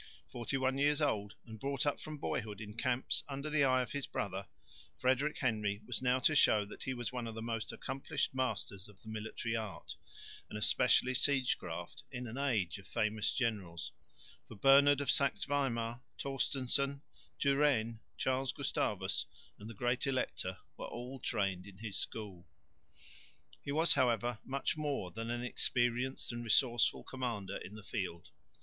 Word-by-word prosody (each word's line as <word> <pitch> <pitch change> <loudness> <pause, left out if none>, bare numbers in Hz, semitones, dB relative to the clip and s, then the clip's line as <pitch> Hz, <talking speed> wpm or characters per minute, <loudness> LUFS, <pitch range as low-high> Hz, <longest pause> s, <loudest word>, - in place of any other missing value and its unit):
Forty 120 +3 -2
one 130 +1 +1
years 145 +1 +4
old 105 -9 0
and 110 -2 -9
brought 140 +2 -1
up 145 - +1
from 155 -1 -6
boyhood 105 - -3
in 105 -1 -7
camps 125 +2 +1
under 140 +2 -4
the 150 -2 +4
eye 130 -1 +4
of - - -8
his 145 -1 -2
brother, 95 -1 -3 0.5
Frederick 130 +4 +2
Henry 105 -5 0
was 125 +1 -1
now 125 0 +3
to 130 +4 +4
show 105 -8 +5
that 100 - -11
he 130 - -1
was 120 0 -3
one 120 -2 -3
of 115 - -6
the 115 - -5
most 115 -1 -2
accomplished 135 0 -2
masters 125 -7 -1
of 100 -2 -17
the - - -15
military 110 +1 -3
art, 110 -4 -4 0.6
and 105 - -5
especially 125 +4 +4
siege 130 -1 +4
craft, - - -6
in 125 0 -4
an 115 0 -6
age 105 -10 0
of 95 - -14
famous 110 0 +1
generals, 100 - -2 0.6
for 115 - -10
Bernard 140 +5 +6
of 140 0 +3
Saxe 140 -1 +2
Weimar, 120 -4 0 0.2
Torstenson, 140 +1 0 0.3
Turenne, 135 -6 +2 0.2
Charles 130 0 +1
Gustavus - - 0 0.3
and 105 +2 -8
the 115 - -8
Great 120 +5 0
Elector 125 -8 -1 0.2
were - - -5
all 125 +3 -6
trained 100 -5 -1
in 95 -2 -12
his 110 -1 -5
school. 100 -6 -3 1.1
He 140 - -4
was, 160 +3 +5
however, 120 -2 +2
much 135 +2 -1
more 145 -12 -2
than 115 +4 -5
an 120 0 -2
experienced 125 +1 0
and 120 0 -4
resourceful 120 +2 +3
commander 115 -7 -3
in 100 - -9
the 105 - -10
field. 90 -4 -4
120 Hz, 165 wpm, -35 LUFS, 110-135 Hz, 1.1 s, Bernard